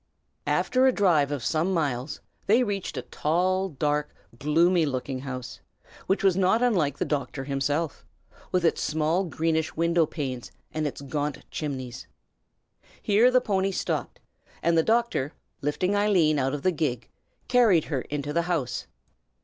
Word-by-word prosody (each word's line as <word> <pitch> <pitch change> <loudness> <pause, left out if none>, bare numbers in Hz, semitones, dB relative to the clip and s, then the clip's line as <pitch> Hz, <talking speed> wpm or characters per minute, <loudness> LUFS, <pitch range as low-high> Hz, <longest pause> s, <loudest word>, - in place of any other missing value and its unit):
After 260 +1 +3
a - - +6
drive 170 - +3
of 145 -4 -3
some 165 +4 +1
miles, 140 -3 -2 0.3
they 230 +5 +5
reached 200 -4 -3
a - - -3
tall, 185 +5 0
dark, 150 -1 -1 0.2
gloomy 165 +4 +3
looking 130 -2 -2
house, 130 -2 -6 0.5
which 195 - +1
was 190 -3 +4
not 195 +5 +3
unlike 165 - +2
the - - -1
doctor 140 -2 -2
himself, 145 +3 -1 0.5
with 180 -1 +1
its 165 - +2
small 160 +5 +1
greenish 160 -1 -1
window 170 0 +2
panes 130 -7 -5 0.2
and 155 -1 -1
its 140 - -6
gaunt 145 +1 -3
chimneys. 130 -5 -5 0.9
Here 215 +4 +4
the 255 0 +4
pony 195 -4 +1
stopped, 185 - -3 0.4
and 170 0 +3
the 165 - +5
doctor, 225 - +1 0.3
lifting 180 +7 0
Eileen 180 -8 +3
out 135 +1 0
of 145 - -6
the 185 - +3
gig, 135 -8 -2 0.4
carried 225 -10 +5
her 135 -5 -2
into 145 +1 -4
the 170 - +2
house. 145 -9 -1
160 Hz, 150 wpm, -26 LUFS, 145-185 Hz, 0.9 s, a